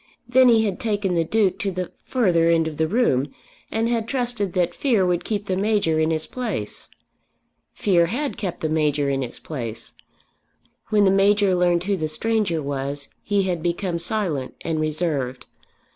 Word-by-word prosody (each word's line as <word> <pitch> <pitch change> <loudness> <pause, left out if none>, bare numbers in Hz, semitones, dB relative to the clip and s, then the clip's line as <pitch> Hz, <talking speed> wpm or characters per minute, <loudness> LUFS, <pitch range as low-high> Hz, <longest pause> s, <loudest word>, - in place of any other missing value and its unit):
Then 255 +1 +5
he 225 -2 +4
had 195 -3 -2
taken 205 -4 0
the 170 -1 +2
Duke 200 +2 +1
to 200 - -1
the 185 -1 -4
further 175 -10 +2
end 165 -1 +3
of 155 -2 -6
the 160 - +1
room, 155 - +1 0.4
and 225 +1 0
had 230 -2 0
trusted 240 -7 -1
that 175 -2 +1
fear 230 -7 +2
would 175 -1 0
keep 210 -2 -2
the 190 - -1
Major 195 -5 +1
in 160 0 +2
his 160 -1 -1
place. 220 - -4 0.8
Fear 175 -4 +2
had 275 - -2
kept 185 -5 -4
the 155 - 0
Major 150 -2 +1
in 135 0 -1
his 125 -2 -5
place. 115 -6 -6 0.9
When 210 -2 +3
the 190 - +5
Major 200 0 +4
learned 175 -1 +2
who 200 +1 0
the 155 -2 -1
stranger 180 -1 0
was, 140 0 -3
he 205 -1 +1
had 180 -3 -1
become 175 +1 -1
silent 170 -8 -1
and 160 -1 -2
reserved. 150 -5 -2
180 Hz, 175 wpm, -23 LUFS, 155-210 Hz, 0.9 s, Then